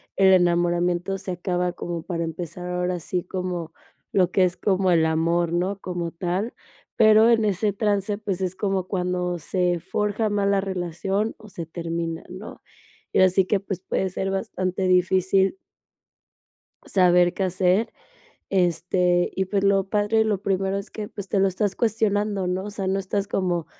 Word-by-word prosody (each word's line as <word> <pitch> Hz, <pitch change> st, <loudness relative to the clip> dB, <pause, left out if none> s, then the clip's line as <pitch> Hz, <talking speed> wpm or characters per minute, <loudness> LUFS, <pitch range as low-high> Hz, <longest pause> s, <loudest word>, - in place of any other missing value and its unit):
el 190 Hz, -1 st, +5 dB
enamoramiento 175 Hz, +1 st, +2 dB
se 195 Hz, -, -8 dB
acaba 180 Hz, 0 st, -1 dB
como 170 Hz, -1 st, -5 dB
para 170 Hz, -1 st, -3 dB
empezar 175 Hz, +2 st, -6 dB
ahora 180 Hz, 0 st, -1 dB
sí 180 Hz, +2 st, -3 dB
como 180 Hz, -3 st, -4 dB, 0.4 s
lo 185 Hz, -2 st, +2 dB
que 190 Hz, -, +3 dB
es 175 Hz, -, -1 dB
como 190 Hz, -2 st, +1 dB
el 165 Hz, -2 st, +4 dB
amor, 165 Hz, +1 st, +1 dB
¿no?, 190 Hz, +3 st, -1 dB
como 175 Hz, -3 st, -4 dB
tal, 180 Hz, +6 st, -2 dB, 0.4 s
pero 220 Hz, +1 st, +6 dB
en 225 Hz, -2 st, +4 dB
ese 205 Hz, 0 st, 0 dB
trance, 205 Hz, -1 st, 0 dB
pues, 195 Hz, -3 st, -4 dB
es 185 Hz, 0 st, -2 dB
como 195 Hz, -3 st, -1 dB
cuando 180 Hz, -2 st, -1 dB
se 175 Hz, +1 st, 0 dB
forja 210 Hz, +4 st, -1 dB
más 200 Hz, -1 st, 0 dB
la 200 Hz, -1 st, +2 dB
relación 190 Hz, +3 st, -2 dB
o 215 Hz, -2 st, -14 dB
se 170 Hz, -3 st, -6 dB
termina, 165 Hz, 0 st, -4 dB
¿no? 185 Hz, +4 st, -9 dB, 0.5 s
Y -, -, 0 dB
ahora 185 Hz, 0 st, +7 dB
sí 185 Hz, 0 st, +2 dB
que, 200 Hz, 0 st, +1 dB
pues, 195 Hz, -2 st, -5 dB
puede 190 Hz, 0 st, -1 dB
ser 195 Hz, +1 st, -3 dB
bastante 190 Hz, -1 st, -2 dB
difícil 190 Hz, -, +3 dB, 1.3 s
saber 180 Hz, -1 st, +4 dB
qué 195 Hz, -, -2 dB
hacer, 185 Hz, +4 st, +1 dB, 0.6 s
este, 180 Hz, -1 st, +2 dB
y 190 Hz, -1 st, -1 dB
pues, 195 Hz, 0 st, 0 dB
lo 195 Hz, -1 st, +3 dB
padre 210 Hz, +2 st, +2 dB
y -, -, +4 dB
lo 205 Hz, -3 st, 0 dB
primero 195 Hz, 0 st, 0 dB
es 200 Hz, -, -7 dB
que -, -, -43 dB
que, -, -, -8 dB
pues, 200 Hz, -3 st, -7 dB
te 195 Hz, -, +1 dB
lo 195 Hz, -, +4 dB
estás 195 Hz, +1 st, -1 dB
cuestionando, 210 Hz, -3 st, 0 dB
¿no?, 185 Hz, +1 st, -1 dB
o 210 Hz, -, -5 dB
sea, 195 Hz, -2 st, -4 dB
no 195 Hz, +1 st, +1 dB
estás 195 Hz, +1 st, -2 dB
como, 175 Hz, -4 st, -1 dB
185 Hz, 175 wpm, -24 LUFS, 175-200 Hz, 1.3 s, ahora